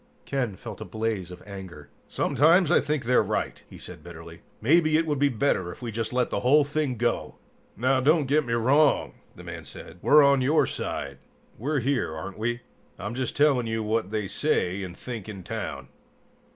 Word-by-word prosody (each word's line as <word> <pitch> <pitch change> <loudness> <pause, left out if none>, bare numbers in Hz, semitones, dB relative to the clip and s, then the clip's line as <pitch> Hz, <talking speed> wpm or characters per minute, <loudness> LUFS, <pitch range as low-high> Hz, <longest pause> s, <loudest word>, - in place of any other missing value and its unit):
Ken 125 -7 -2
felt - - -9
a - - -2
blaze 110 -5 -3
of 90 - -11
anger. 95 -7 -9 0.2
"Sometimes, 165 +4 +3
I - - +5
think 150 -4 -2
they're 125 +1 +4
right!" - - -2
he - - -11
said - - -10
bitterly. - - -11 0.2
"Maybe 155 +5 +4
it 165 - +1
would 150 -3 -1
be 145 0 +4
better 110 -8 0
if - - -12
we 115 - -3
just 110 +1 -3
let 125 -1 0
the - - 0
whole 145 +4 +5
thing 145 -2 -1
go!" 120 +1 -1 0.4
"Now 130 +4 +2
don't 150 +2 +3
get 150 +3 +2
me 120 -3 -3
wrong," 135 +6 +3 0.2
the - - -12
man - - -7
said. 90 - -12
"We're 150 +1 +6
on 140 -1 +4
your 145 +5 +3
side. - - -4 0.4
We're 140 +3 -1
here, 120 - 0
aren't 95 +6 -7
we? 120 +2 -1 0.4
I'm 105 +3 -5
just 130 -1 -3
telling 140 -5 +3
you 110 0 -2
what 110 -1 -1
they 105 -1 -2
say 90 +1 0
and 90 -2 -7
think 115 -5 -7
in 95 -3 -8
town." - - -5
125 Hz, 195 wpm, -26 LUFS, 105-145 Hz, 0.4 s, We're